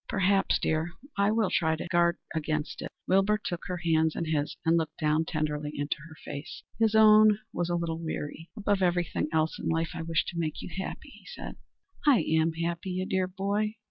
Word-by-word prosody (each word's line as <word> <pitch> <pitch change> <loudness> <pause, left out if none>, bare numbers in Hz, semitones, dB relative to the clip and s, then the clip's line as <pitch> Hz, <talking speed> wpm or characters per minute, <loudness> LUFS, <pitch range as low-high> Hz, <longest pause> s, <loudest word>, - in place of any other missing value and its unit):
"Perhaps, 195 +1 +2
dear. 160 +2 -1 0.2
I 200 +1 +3
will 215 -2 +1
try 160 -2 +2
to 160 - -6
guard 170 0 +3 0.2
against 155 -1 -2
it." - - -5 0.2
Wilbur 195 +3 +4
took 175 -5 -5
her 180 - -2
hands 160 -2 +2
in 170 - -2
his 150 -2 -1
and 165 +1 +4
looked 160 -2 -1
down 155 0 +1
tenderly 150 -2 -2
into 145 0 -2
her 160 - -12
face. 145 +3 -7 0.2
His 220 -1 +3
own 215 -1 +7 0.2
was 175 0 -1
a 175 - +1
little 165 -1 -2
weary. 160 0 -5
"Above 205 -2 +1
everything 175 -3 +1
else 160 0 +1
in - - -4
life 165 0 0
I - - -4
wish, 165 -1 0
to 170 - -5
make 155 -2 -2
you - - -6
happy," 190 0 -5
he - - -17
said. - - -7 0.5
"I 275 - +5
am 160 +1 +2
happy, 170 +3 -3
you 185 +1 -1
dear 190 -1 0
boy." 200 +3 -1
170 Hz, 205 wpm, -28 LUFS, 160-195 Hz, 0.5 s, own